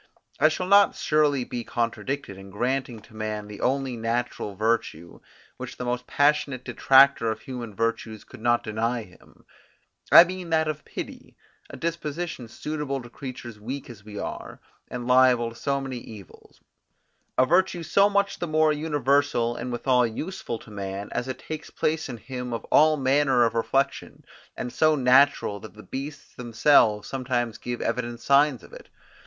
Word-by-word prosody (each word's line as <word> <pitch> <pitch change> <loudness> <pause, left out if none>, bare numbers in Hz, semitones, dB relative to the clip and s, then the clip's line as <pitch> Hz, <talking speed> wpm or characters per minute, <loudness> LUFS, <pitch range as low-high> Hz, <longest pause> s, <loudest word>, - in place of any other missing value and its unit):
I 155 +3 +6
shall 180 +3 -3
not 200 +1 +5
surely 150 -4 +2
be 120 -1 -5
contradicted, 120 0 -3
in 95 +1 -12
granting 120 +2 -2
to 110 - -18
man 110 -1 -4
the 105 -1 -9
only 135 -1 0
natural 115 -2 -3
virtue, 110 -6 -2 0.4
which - - -8
the 125 - -5
most 125 0 -3
passionate 145 -3 +1
detractor 135 -3 +5
of 110 0 -4
human 120 -5 -7
virtues 110 -1 -2
could - - -14
not 120 0 +2
deny 115 +2 -2
him, 90 -3 -20 0.7
I 170 - +11
mean 180 -1 -6
that 160 -1 +2
of 155 -1 -4
pity, - - -8 0.3
a - - -9
disposition 165 -4 -4
suitable 150 +2 -4
to 120 - -13
creatures 120 -5 -8
weak 130 +4 -6
as 105 -3 -14
we 105 -1 -10
are, - - -6 0.3
and 120 -1 -5
liable 125 -2 +4
to - - -14
so 140 +3 -1
many 135 -2 -5
evils; 105 -6 -14 0.8
a 130 - +5
virtue 175 +2 +2
so 200 +5 +4
much 200 0 0
the 175 - -2
more 155 0 +3
universal, 145 -5 +1
and 125 +1 -5
withal 125 0 +2
useful 120 +1 -5
to 110 - -15
man, 100 0 -5
as 125 - -3
it 130 - -4
takes 155 0 -7
place 155 -1 -1
in 120 - -6
him 125 0 -6
of 115 - -4
all 155 0 +5
manner 135 -2 +3
of 115 - 0
reflection; 135 +4 -1 0.3
and 125 - -5
so 155 -1 +3
natural, 130 -5 +3
that 110 0 -12
the 105 - -12
beasts 140 +2 -7
themselves 115 -3 +3
sometimes 125 -4 -2
give 120 -1 -5
evident 120 0 -2
signs 140 0 +3
of - - -16
it. - - -12
125 Hz, 170 wpm, -25 LUFS, 115-145 Hz, 0.8 s, I